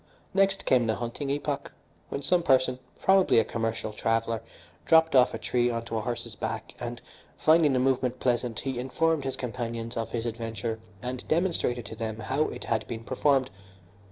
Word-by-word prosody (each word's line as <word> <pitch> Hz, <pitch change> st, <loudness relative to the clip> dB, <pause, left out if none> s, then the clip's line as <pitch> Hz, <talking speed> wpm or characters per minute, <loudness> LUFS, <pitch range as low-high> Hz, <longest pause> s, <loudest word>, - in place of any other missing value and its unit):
Next 195 Hz, 0 st, +2 dB
came 125 Hz, -3 st, +3 dB
the 110 Hz, -, +1 dB
hunting 120 Hz, +4 st, -4 dB
epoch, 145 Hz, 0 st, -2 dB, 0.4 s
when 140 Hz, -, -4 dB
some 180 Hz, +3 st, +3 dB
person, 130 Hz, -4 st, +3 dB, 0.2 s
probably 190 Hz, -6 st, +5 dB
a 115 Hz, -, +6 dB
commercial 115 Hz, -1 st, -3 dB
traveller, 115 Hz, 0 st, 0 dB, 0.5 s
dropped 160 Hz, -2 st, +5 dB
off 125 Hz, -3 st, +5 dB
a -, -, -2 dB
tree 120 Hz, +2 st, +1 dB
on 115 Hz, -1 st, -3 dB
to 115 Hz, -, -4 dB
a -, -, 0 dB
horse's 120 Hz, 0 st, -4 dB
back, 110 Hz, +1 st, -4 dB
and 120 Hz, 0 st, -5 dB, 0.4 s
finding 155 Hz, -2 st, +5 dB
the -, -, +2 dB
movement 130 Hz, -1 st, +1 dB
pleasant 120 Hz, -2 st, 0 dB
he 130 Hz, -2 st, -3 dB
informed 145 Hz, +4 st, +1 dB
his 135 Hz, -1 st, -2 dB
companions 115 Hz, -2 st, -4 dB
of 115 Hz, -1 st, -2 dB
his 115 Hz, -1 st, -3 dB
adventure 115 Hz, 0 st, -3 dB, 0.2 s
and 125 Hz, 0 st, -5 dB
demonstrated 160 Hz, -, +1 dB
to 110 Hz, -, -7 dB
them 110 Hz, -1 st, -4 dB
how 135 Hz, +7 st, 0 dB
it -, -, -5 dB
had 110 Hz, -2 st, -1 dB
been 115 Hz, -1 st, -5 dB
performed. 130 Hz, +1 st, +2 dB
125 Hz, 180 wpm, -28 LUFS, 115-135 Hz, 0.5 s, a